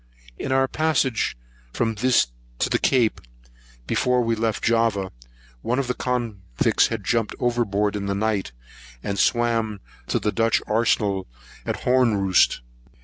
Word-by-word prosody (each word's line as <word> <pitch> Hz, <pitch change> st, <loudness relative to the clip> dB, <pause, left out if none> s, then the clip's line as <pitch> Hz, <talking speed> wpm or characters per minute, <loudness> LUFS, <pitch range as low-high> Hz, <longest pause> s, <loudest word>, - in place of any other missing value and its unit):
In -, -, -3 dB
our 135 Hz, 0 st, +3 dB
passage 135 Hz, -, 0 dB, 0.4 s
from 115 Hz, -1 st, 0 dB
this 125 Hz, +3 st, +3 dB, 0.3 s
to -, -, -1 dB
the -, -, +2 dB
Cape, 120 Hz, -5 st, +2 dB, 0.6 s
before 125 Hz, -, +1 dB
we 115 Hz, 0 st, +1 dB
left 115 Hz, -1 st, -1 dB
Java, 115 Hz, -5 st, +1 dB, 0.5 s
one 125 Hz, +2 st, -1 dB
of 140 Hz, -, 0 dB
the 125 Hz, -, -1 dB
convicts 115 Hz, -, 0 dB
had -, -, -4 dB
jumped 115 Hz, -2 st, 0 dB
over 120 Hz, -1 st, +1 dB
board 105 Hz, 0 st, -1 dB
in 100 Hz, -1 st, -3 dB
the 100 Hz, -, -1 dB
night, 100 Hz, -6 st, -1 dB, 0.5 s
and 100 Hz, -1 st, -3 dB
swam 115 Hz, -3 st, +1 dB, 0.3 s
to -, -, 0 dB
the 105 Hz, -, 0 dB
Dutch 115 Hz, 0 st, +2 dB
arsenal 105 Hz, -3 st, +1 dB, 0.4 s
at -, -, -2 dB
Honroost. 110 Hz, -, +3 dB
115 Hz, 145 wpm, -23 LUFS, 105-125 Hz, 0.6 s, our